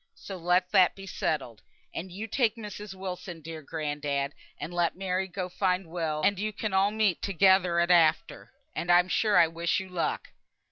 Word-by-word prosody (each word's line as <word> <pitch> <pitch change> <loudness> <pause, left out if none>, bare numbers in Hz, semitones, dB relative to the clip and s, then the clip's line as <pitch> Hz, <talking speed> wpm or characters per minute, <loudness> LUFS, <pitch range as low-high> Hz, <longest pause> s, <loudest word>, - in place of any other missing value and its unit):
So 195 - -8
let 180 +1 +1
that 185 -4 +5
be 195 - -10
settled. 135 - -3 0.3
And 180 +2 -6
you 200 +5 -5
take 225 -1 +1
Mrs. 210 -3 -8
Wilson, 180 -2 -6
dear 160 0 -8
grandad, 145 -2 -3 0.2
and 175 - -6
let 175 -1 +1
Mary 190 0 -2
go 185 0 -4
find 185 0 0
Will, 160 -2 -3
and 200 -1 +2
you 215 +1 -1
can 210 -1 -4
all 190 +1 +4
meet 210 -4 +1
together 190 -2 +3
at 170 +1 +2
after, 160 -3 +2 0.2
and 175 - 0
I'm 175 +1 +5
sure 210 -1 +2
I 170 - +7
wish 165 +1 -1
you 190 0 -8
luck." 180 -2 -2
180 Hz, 185 wpm, -28 LUFS, 165-195 Hz, 0.3 s, I